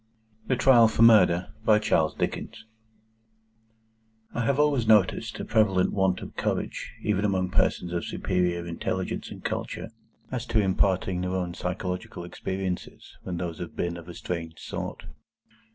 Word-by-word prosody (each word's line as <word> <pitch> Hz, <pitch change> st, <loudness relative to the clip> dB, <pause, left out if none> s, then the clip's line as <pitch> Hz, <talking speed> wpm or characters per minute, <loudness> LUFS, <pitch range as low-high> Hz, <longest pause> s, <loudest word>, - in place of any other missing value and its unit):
THE 130 Hz, -, +2 dB
TRIAL 120 Hz, -3 st, +6 dB
FOR 110 Hz, +1 st, +2 dB
MURDER. 105 Hz, -6 st, +5 dB
I 105 Hz, -1 st, +6 dB, 2.6 s
HAVE 135 Hz, +4 st, +1 dB
always 145 Hz, -6 st, +2 dB
noticed 105 Hz, -4 st, +3 dB
a -, -, -4 dB
prevalent 100 Hz, -5 st, +2 dB
want 95 Hz, -2 st, +1 dB
of -, -, -10 dB
courage, -, -, -2 dB
even 105 Hz, -1 st, +1 dB
among 95 Hz, -3 st, 0 dB
persons 85 Hz, 0 st, +1 dB
of 85 Hz, -, -1 dB
superior 90 Hz, -2 st, -1 dB
intelligence 85 Hz, -1 st, -3 dB
and -, -, -10 dB
culture, 110 Hz, -, -4 dB, 0.4 s
as 125 Hz, -1 st, -3 dB
to 115 Hz, -2 st, +2 dB
imparting 95 Hz, -2 st, +1 dB
their 90 Hz, +1 st, -2 dB
own 90 Hz, -2 st, -2 dB
psychological 90 Hz, 0 st, -4 dB
experiences 95 Hz, +1 st, -5 dB
when 90 Hz, -2 st, -4 dB
those 85 Hz, -2 st, -4 dB
have 85 Hz, -, -7 dB
been 85 Hz, -1 st, -2 dB
of 85 Hz, -1 st, -10 dB
a 85 Hz, -, -8 dB
strange 85 Hz, -2 st, -5 dB
sort. -, -, -6 dB
95 Hz, 135 wpm, -27 LUFS, 90-110 Hz, 2.6 s, TRIAL